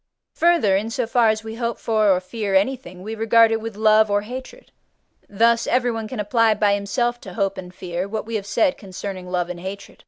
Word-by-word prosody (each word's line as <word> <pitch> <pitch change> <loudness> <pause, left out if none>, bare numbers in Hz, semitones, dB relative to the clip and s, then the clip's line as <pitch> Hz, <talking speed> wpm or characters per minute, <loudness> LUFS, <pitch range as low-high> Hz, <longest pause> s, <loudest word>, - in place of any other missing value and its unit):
Further, 335 - +3
in 210 +3 -1
so 245 +1 -1
far 235 -1 +3
as 215 0 -1
we 220 0 -7
hope 235 -1 -2
for 215 -2 +1
or 185 -2 +4
fear 200 +1 -3
anything, 190 -4 -1
we 215 +2 -5
regard 225 +1 +4
it 225 0 0
with 225 -1 -6
love 215 0 +4
or 205 0 +1
hatred; 260 - -9 0.6
thus 230 +3 +2
everyone 240 -3 0
can 215 - -6
apply 220 +1 +2
by 205 -1 +2
himself 240 +4 -1
to 185 - -10
hope 195 -2 0
and 180 -2 -8
fear 180 0 -5
what 215 +1 -4
we 230 - -7
have 205 -2 -3
said 275 +7 +1
concerning 190 -1 -7
love 180 -1 -1
and 180 -1 -6
hatred. 195 +2 -8
215 Hz, 215 wpm, -22 LUFS, 195-230 Hz, 0.6 s, or